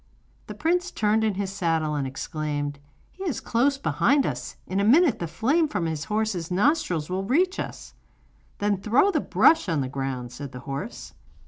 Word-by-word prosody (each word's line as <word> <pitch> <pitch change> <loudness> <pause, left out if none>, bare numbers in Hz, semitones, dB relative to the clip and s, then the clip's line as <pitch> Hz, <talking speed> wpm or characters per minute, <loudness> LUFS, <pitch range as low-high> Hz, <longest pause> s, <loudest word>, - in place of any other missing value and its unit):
The - - -7
prince 355 +3 0
turned 215 +1 +1
in 215 -3 +1
his 195 0 -2
saddle, 165 -5 0
and 140 -2 -1
exclaimed: 145 +1 -4 0.3
'He 380 - -9
is 325 - -1
close 275 +4 +1
behind 280 0 +2
us, - - -4
in 190 - -2
a - - +2
minute 275 - +5
the 170 - -3
flame 275 - +1
from 205 - -2
his 160 -1 -3
horse's 210 -6 -1
nostrils 185 - +1
will 185 +1 -2
reach 360 - +1
us.' - - -6 0.6
'Then 205 -1 +1
throw 245 - +3
the - - +1
brush 320 - +4
on 160 -4 +1
the 130 - -2
ground,' 130 -2 -4
said 140 0 -8
the 125 - -8
horse. 135 +2 -6
195 Hz, 185 wpm, -25 LUFS, -, 0.6 s, minute